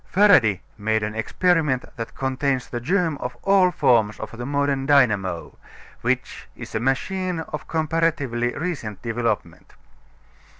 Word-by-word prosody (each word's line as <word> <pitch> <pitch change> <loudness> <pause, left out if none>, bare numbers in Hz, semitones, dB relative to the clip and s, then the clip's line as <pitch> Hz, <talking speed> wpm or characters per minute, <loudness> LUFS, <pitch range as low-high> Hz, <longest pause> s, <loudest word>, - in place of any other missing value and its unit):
Faraday 140 - +5 0.2
made 110 +1 0
an 105 0 -3
experiment 150 +3 +1
that 115 -1 -6
contains 130 -1 -1
the 120 - -5
germ 165 +1 0
of 125 - -5
all 195 -2 +5
forms 120 -10 +2
of - - -6
the 120 +2 -6
modern 140 -1 0
dynamo, 105 - +2 0.5
which - - -2
is - - -9
a 110 - 0
machine 175 - -1
of 150 -1 -7
comparatively 155 -7 0
recent 145 - -4
development. 115 -7 -3
135 Hz, 130 wpm, -23 LUFS, 115-160 Hz, 0.5 s, Faraday